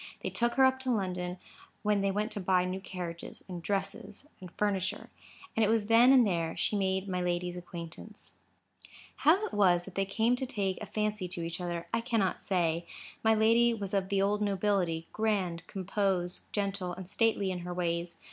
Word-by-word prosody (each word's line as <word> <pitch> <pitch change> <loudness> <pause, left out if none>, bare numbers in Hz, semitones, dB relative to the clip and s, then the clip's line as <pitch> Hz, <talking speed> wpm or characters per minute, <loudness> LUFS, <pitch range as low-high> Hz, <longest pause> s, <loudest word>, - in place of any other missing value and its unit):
They - - -2
took 235 0 +1
her 265 - +6
up 260 0 +3
to 260 0 -2
London, 180 -5 -1 0.5
when 210 -1 +2
they 195 - +2
went 210 +3 -1
to 210 - -3
buy 185 -1 +2
new 185 +1 -3
carriages, 180 -3 -7
and 180 -2 -6
dresses, 200 - -3
and 180 -2 -10
furniture. 200 -3 -1 0.4
And 225 - +3
it 210 - +3
was 220 -2 +2
then 230 +4 +6
and 255 -3 +7
there 170 -4 -1
she - - +1
made 190 -1 0
my 180 -1 -1
lady's 175 0 -1
acquaintance. 175 +4 -9 0.8
How 355 +8 +4
it - - -7
was 180 -4 +4
that 195 - -11
they 195 +1 0
came 225 +5 +2
to 260 - -2
take 195 -6 -2
a 210 - -5
fancy 210 -2 -1
to 175 -1 -4
each 170 +2 -5
other, 175 -1 -3
I 230 - +2
cannot 225 -6 0
say. 170 -3 0 0.4
My 220 0 +5
lady 230 +2 +4
was 200 -3 -4
of 195 -1 0
the 195 -1 +2
old 205 +1 +1
nobility,—grand, 195 -1 0
compose, 190 -2 -1
gentle, 195 -3 -2
and 185 0 -8
stately 205 -1 +1
in 180 - -3
her 175 +1 -6
ways. 170 -1 -2
195 Hz, 190 wpm, -31 LUFS, 180-215 Hz, 0.8 s, and